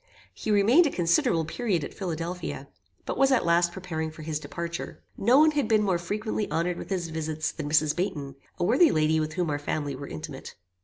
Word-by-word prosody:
He - - -6
remained 225 - +5
a - - 0
considerable 170 - +2
period 185 -2 -1
at - - -6
Philadelphia, 175 -1 -4 0.4
but - - -3
was 270 0 +5
at 260 - +3
last 170 0 +3
preparing 170 -3 -4
for 155 0 -11
his 155 -1 -3
departure. 170 +3 -6
No 240 +6 +4
one 310 +1 +6
had 290 -6 0
been 215 -1 +3
more 185 -4 +1
frequently 210 +4 -3
honoured 170 +1 -1
with - - -8
his 180 -4 -2
visits 155 -1 -2
than 150 -2 -5
Mrs. 150 0 +3
Baynton, 155 -7 -3 0.2
a 175 - -1
worthy 255 - +5
lady 155 0 +2
with 155 0 -2
whom 175 -3 -1
our 145 - -1
family 145 -1 -3
were 140 +2 -7
intimate. 80 0 -8
170 Hz, 205 wpm, -27 LUFS, 155-205 Hz, 0.4 s, one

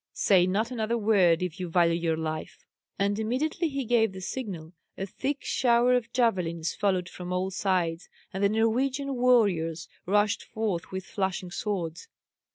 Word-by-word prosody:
Say 185 -3 +4
not 215 +6 0
another 230 -1 -1
word, 190 -6 +3
if 180 +1 -4
you 180 -1 -4
value 170 0 +3
your 165 -1 0
life." 155 -1 -5 0.3
And 200 +1 0
immediately 275 +9 -1
he 275 -2 -3
gave 225 -3 +2
the 190 - -7
signal, 185 -5 -6 0.2
a 190 - -3
thick 270 +8 -3
shower 245 0 +3
of 240 -2 0
javelins 180 -10 0
followed 185 -4 0
from 180 -1 -8
all 185 +1 -1
sides, 180 -3 -1 0.2
and 190 +1 -2
the 200 - +5
Norwegian 255 +6 +1
warriors 200 -11 +2 0.2
rushed 205 +2 +2
forth 210 -6 -3
with 190 0 -5
flashing 190 -2 -3
swords. 185 - -3
195 Hz, 160 wpm, -27 LUFS, 175-235 Hz, 0.3 s, the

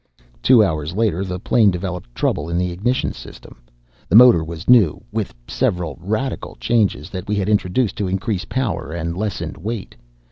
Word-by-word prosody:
Two 125 -4 +6
hours 80 -3 -2
later 105 -4 +1
the 90 -1 -4
plane 110 +1 +3
developed 90 -8 -5
trouble 75 +3 -1
in 85 - -1
the 90 0 0
ignition 115 +9 -1
system. - - -13 0.5
The 95 - +2
motor 120 -8 +8
was 80 +2 -8
new, 110 -11 +4
with - - -3
several 85 -5 -1
radical 110 +8 -3
changes 105 -10 0
that 95 0 -6
we 105 - 0
had 100 -1 -1
introduced 105 +2 +1
to 100 - -1
increase 95 +2 -2
power 115 - -3
and 85 0 -3
lessen 105 +1 -3
weight. 105 +3 -5
95 Hz, 170 wpm, -20 LUFS, 85-110 Hz, 0.5 s, motor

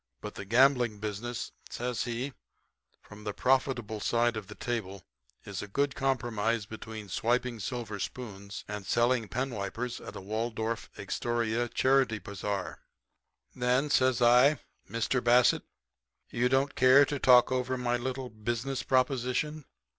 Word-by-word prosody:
But - - -7
the 100 - -7
gambling 120 0 +4
business,' 110 +3 -4 0.2
says 120 -1 -2
he, 125 +3 -3 0.7
'from 105 +1 -13
the 105 -2 -4
profitable 125 -3 +1
side 120 +3 +1
of 105 -3 -5
the 105 - -10
table 100 -6 -4 0.4
is 100 -1 -5
a 105 - -6
good 140 +7 0
compromise 115 -5 0
between 110 -1 -8
swiping 120 +4 0
silver 110 -1 -4
spoons 100 -3 -6
and 105 -1 -5
selling 120 +2 +2
penwipers 120 -1 -3
at - - -9
a - - -5
Waldorf 110 +2 -3
Astoria 120 +3 -1
charity 130 -4 +2
bazar.' 100 0 -4 0.8
"'Then,' 125 +4 +1
says 130 -3 +3
I, 125 +5 +6 0.3
'Mr. 115 +4 0
Bassett, 120 +1 +4 0.7
you 125 +1 +1
don't 135 +2 +2
care 130 +3 +6
to 145 0 -3
talk 125 -1 +6
over 130 0 0
my 120 -1 0
little 130 +1 -4
business 120 +5 -3
proposition?' 130 +3 0
120 Hz, 135 wpm, -30 LUFS, 110-130 Hz, 0.8 s, I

